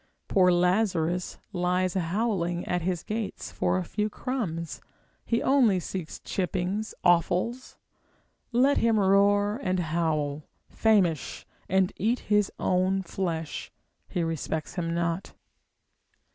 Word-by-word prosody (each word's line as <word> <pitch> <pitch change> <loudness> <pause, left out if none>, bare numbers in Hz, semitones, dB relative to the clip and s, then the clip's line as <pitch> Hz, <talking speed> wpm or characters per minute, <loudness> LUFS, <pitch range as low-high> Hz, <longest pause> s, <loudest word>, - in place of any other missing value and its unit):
Poor 180 -2 +4
Lazarus 180 -1 +1 0.2
lies 180 0 +1
howling 180 -1 -1
at 180 0 0
his 175 -1 -2
gates 215 -1 -4
for - - 0
a 185 - -1
few 210 +4 -2
crumbs, 185 - -4 0.4
he 230 0 0
only 245 -9 +4
seeks 175 -2 -5
chippings, 190 +3 -2
offals; 180 +8 +1 0.7
let 260 +4 +4
him 225 -2 +3
roar 205 +2 +3
and 185 -4 0
howl, 155 -3 -1 0.2
famish, 190 - +1 0.2
and 190 +1 +2
eat 235 +4 +1
his 210 -1 +2
own 185 +1 +1
flesh, 165 -4 -4 0.4
he 175 - -1
respects 160 -1 -3
him 170 -2 -2
not. 170 +2 -2
185 Hz, 115 wpm, -27 LUFS, 170-210 Hz, 0.7 s, Poor